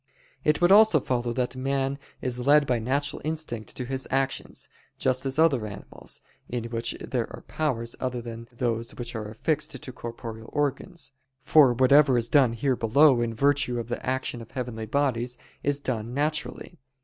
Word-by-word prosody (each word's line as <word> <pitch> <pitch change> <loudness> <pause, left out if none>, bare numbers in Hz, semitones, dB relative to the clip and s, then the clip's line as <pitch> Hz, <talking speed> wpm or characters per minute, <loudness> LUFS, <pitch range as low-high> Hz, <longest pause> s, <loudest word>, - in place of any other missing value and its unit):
It 150 0 +3
would 175 +1 +5
also 210 -5 +7
follow 120 -2 -1
that 125 +1 -1
man 135 +1 -1 0.2
is 125 -1 -2
led 145 0 +6
by 125 -3 +1
natural 140 +5 -1
instinct 155 -8 -4
to 125 - -3
his 135 +1 -3
actions, 135 0 -1 0.3
just 130 +1 0
as 135 +1 -1
other 140 -9 +3
animals, 100 -1 -8 0.3
in 120 -2 -2
which 115 0 -1
there - - -3
are - - -9
powers 120 -7 -2
other 125 -1 -2
than 115 0 -8
those 115 -1 -2
which 120 - -5
are 110 -2 -5
affixed 150 +5 -2
to 130 - -6
corporeal 115 -2 -8
organs: 145 +3 -2 0.3
for 135 -2 +5
whatever 130 +1 +5
is 115 -1 +1
done 135 -6 +5
here 130 +3 +1
below 125 +3 +5
in 115 -1 -1
virtue 140 -1 +2
of 115 0 -6
the 120 - -4
action 130 -2 -2
of 115 - -11
heavenly 120 -4 -5
bodies, 125 -2 0 0.2
is 145 0 0
done 120 -3 -3
naturally. 155 +3 -2
130 Hz, 175 wpm, -26 LUFS, 120-145 Hz, 0.3 s, also